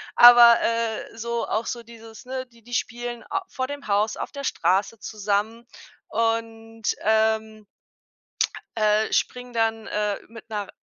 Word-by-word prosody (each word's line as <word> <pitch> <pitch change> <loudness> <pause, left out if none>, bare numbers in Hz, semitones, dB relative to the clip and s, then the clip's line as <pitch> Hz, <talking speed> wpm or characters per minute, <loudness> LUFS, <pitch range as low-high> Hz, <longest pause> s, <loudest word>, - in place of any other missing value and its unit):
aber, 240 -1 +9
äh, 230 -1 -2
so 235 +1 -2
auch 220 +1 -1
so 235 -1 -4
dieses, 225 -1 -13
ne, 260 0 -4
die 235 -2 -23
die 245 +1 -12
spielen 240 0 -3
a 390 -1 -1
vor 260 0 -3
dem 285 -2 -7
Haus 210 +2 +1
auf - - -5
der 280 0 -6
Straße 200 -1 0
zusammen 215 +2 -2 0.4
und, 225 0 -2 0.2
ähm, 220 0 +1 1.1
äh, 215 0 +2
springen, 250 0 -1
dann, 225 -1 0
äh, 210 -1 -1
mit 230 0 -13
'ner, 205 -2 -4
225 Hz, 145 wpm, -24 LUFS, 215-235 Hz, 1.1 s, aber